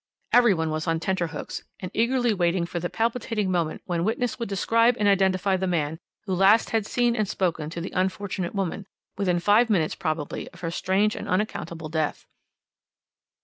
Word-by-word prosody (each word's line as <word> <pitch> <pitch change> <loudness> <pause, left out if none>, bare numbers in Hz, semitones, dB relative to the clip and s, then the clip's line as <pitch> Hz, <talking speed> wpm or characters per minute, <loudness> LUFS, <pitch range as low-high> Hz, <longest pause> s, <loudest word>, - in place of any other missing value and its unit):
"Every 240 -5 +6
one 160 -1 -1
was 155 0 -3
on 165 0 +1
tenter 175 0 -1
hooks, - - -6 0.2
and 185 -1 -6
eagerly 240 0 +2
waiting 175 -2 +1
for 175 0 -4
the 175 +1 -3
palpitating 225 -3 -1
moment 170 -3 -1
when 170 -2 -1
witness 235 +4 -1
would 235 - -3
describe 230 +5 +3
and 210 - +2
identify 190 -1 +3
the 190 0 -1
man 160 -3 -1 0.2
who 190 - -3
last 195 +5 +4
had 220 -2 0
seen 240 -1 +1
and 215 -3 0
spoken 165 -6 -1
to 170 - -6
the 170 - -6
unfortunate 190 0 -2
woman, 195 0 -2 0.3
within 180 -4 +1
five 210 +6 +4
minutes 170 -7 +2
probably 155 -2 -3
of - - -15
her 165 -2 -2
strange 195 +4 +1
and - - -6
unaccountable 170 -5 -2
death. 155 -1 -2
190 Hz, 185 wpm, -25 LUFS, 170-215 Hz, 0.3 s, Every